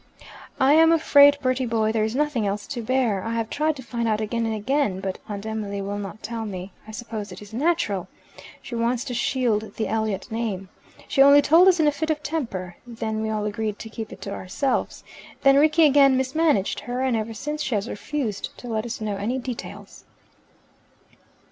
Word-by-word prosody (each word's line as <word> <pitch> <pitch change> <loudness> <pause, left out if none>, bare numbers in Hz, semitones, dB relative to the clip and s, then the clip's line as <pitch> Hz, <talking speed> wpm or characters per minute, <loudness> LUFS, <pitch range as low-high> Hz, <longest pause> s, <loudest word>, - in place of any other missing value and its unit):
"I 270 +1 +5
am 325 +1 +6
afraid, 285 -3 +6
Bertie 255 0 +1
boy, 220 -1 +1
there 220 -1 +1
is 220 +2 -2
nothing 280 -7 0
else 200 +1 -3
to 255 -5 -5
bear, 230 -5 0
I 230 +1 -3
have 225 -1 -2
tried 310 +1 0
to 260 - -9
find 235 -1 -3
out 215 -1 +1
again 230 +1 -1
and 220 - -1
again, 215 -3 0
but 190 -1 -4
Aunt 205 0 -5
Emily 215 -2 -4
will 200 +1 -4
not 205 +1 -8
tell 225 +1 -4
me. 190 -2 -6 0.2
I - - -8
suppose 220 -3 -6
it 180 - -9
is 210 +1 -13
natural. 265 - 0 0.6
She - - -9
wants 235 +1 0
to 250 - -5
shield 225 -4 0
the 220 - -2
Elliot 220 -3 -2
name. 210 -5 -3 0.4
She 275 - +2
only 280 +1 +8
told 340 +4 +6
us 365 -2 +5
in 315 - +4
a 295 - +4
fit 315 +2 -3
of 300 -1 -1
temper; 195 - -4
then 220 -2 -3
we 220 - -2
all 215 -1 -2
agreed 210 0 -3
to 225 - -8
keep 220 -1 -6
it - - -11
to 200 - -5
ourselves; 230 +10 -2 0.4
then 275 0 +6
Rickie 310 +2 +5
again 275 -2 +5
mismanaged 265 -5 +1
her, 245 +1 -4
and 260 -3 +1
ever 225 0 -3
since 300 +6 -4
she 265 -6 -1
has 205 +2 -1
refused 225 -2 -4
to 245 - -10
let 225 0 -2
us 230 - -6
know 210 -2 -2
any 220 +6 -2
details." 250 -2 -8
230 Hz, 205 wpm, -24 LUFS, 210-275 Hz, 0.6 s, only